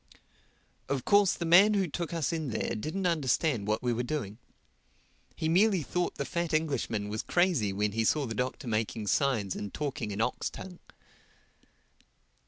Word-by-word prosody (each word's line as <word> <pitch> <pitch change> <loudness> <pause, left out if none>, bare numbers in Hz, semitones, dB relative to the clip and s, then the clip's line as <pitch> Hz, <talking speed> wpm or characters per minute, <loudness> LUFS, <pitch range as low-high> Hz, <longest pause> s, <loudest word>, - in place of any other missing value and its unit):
Of 135 -3 -1
course 205 -2 +5
the 170 - -4
man 190 +6 +6
who 195 -2 +1
took 170 +2 -4
us 165 -3 -1
in 160 -4 -2
there 110 0 -2
didn't 155 - -3
understand 145 - +1
what 110 +2 0
we 120 -1 +1
were 120 - -1
doing. 120 -5 -4 1.0
He 160 - -2
merely 190 +1 +3
thought 180 +6 -2
the 140 - -3
fat 170 +4 -1
Englishman 135 -9 -1
was 105 +1 -3
crazy 175 - +1
when 105 +2 0
he 115 +2 0
saw 145 +6 +2
the 115 - -4
Doctor 125 +2 -3
making 110 -1 -2
signs 110 -5 +1
and 100 - -5
talking 135 -7 -3
in 100 0 -5
ox 115 +3 -1
tongue. 180 -2 -10
140 Hz, 170 wpm, -29 LUFS, 110-170 Hz, 1.0 s, man